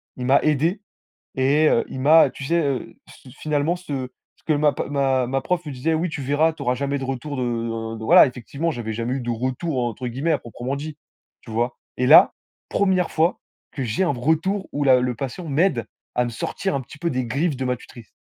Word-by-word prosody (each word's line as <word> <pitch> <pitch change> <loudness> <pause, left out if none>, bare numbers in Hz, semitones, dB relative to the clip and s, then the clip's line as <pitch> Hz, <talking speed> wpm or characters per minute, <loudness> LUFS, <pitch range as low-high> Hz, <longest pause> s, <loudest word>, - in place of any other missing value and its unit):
il 125 - -5
m'a 135 +2 +5
aidé, 160 +7 +1 0.5
et 140 +4 +3
heu, - - +2
il 130 - -6
m'a 155 0 +6
tu 140 - -9
sais, 170 +3 +2
heu, 140 -4 -2
c - - -14 0.2
fi - - -13
finalement, 150 +3 -1
ce 140 -8 -5 0.3
ce - - -32
que 155 - +2
ma 150 0 +3
p - - -3
ma 135 -3 +1
ma 135 +1 -1
prof 180 -2 -1
me 145 - -5
disait: 135 +6 -1
«Oui 165 +3 0
tu 150 - -5
verras, 150 +4 +2
tu - - -12
auras 125 - +1
jamais 140 +2 -1
de 135 - -5
retour 135 +2 -4
de 115 -2 -3
de» 110 - -8
voilà - - +8
effectivement, 140 +6 -3
j'avais 110 -4 -4
«jamais 120 +3 -2
eu - - -2
de 120 - -5
retour», 130 +4 -2
entre 120 +2 -3
guillemets, 135 +8 -1
à - - +1
proprement 120 +3 -5
dit, 150 +1 -7 0.4
tu 115 - -11
vois? 120 +2 -1 0.2
Et 125 0 +1
là, 155 - +8 0.4
1re 185 -3 +1
fois 165 +3 +1 0.3
que 135 - -4
j'ai 115 +11 0
un 170 - +1
retour 160 +10 0
où 145 - -1
la 130 -2 +6
le 125 -1 0
patient 135 +7 -5
m'aide 140 - +1 0.3
à 125 - +3
me 120 - -2
sortir 185 +10 -3
un 140 - 0
petit 140 +4 -13
peu 170 +2 -1
des 130 -2 -1
griffes 140 +4 -1
de 130 - -3
ma 125 0 0
tutrice. 120 -2 -14
135 Hz, 235 wpm, -22 LUFS, 125-155 Hz, 0.5 s, voilà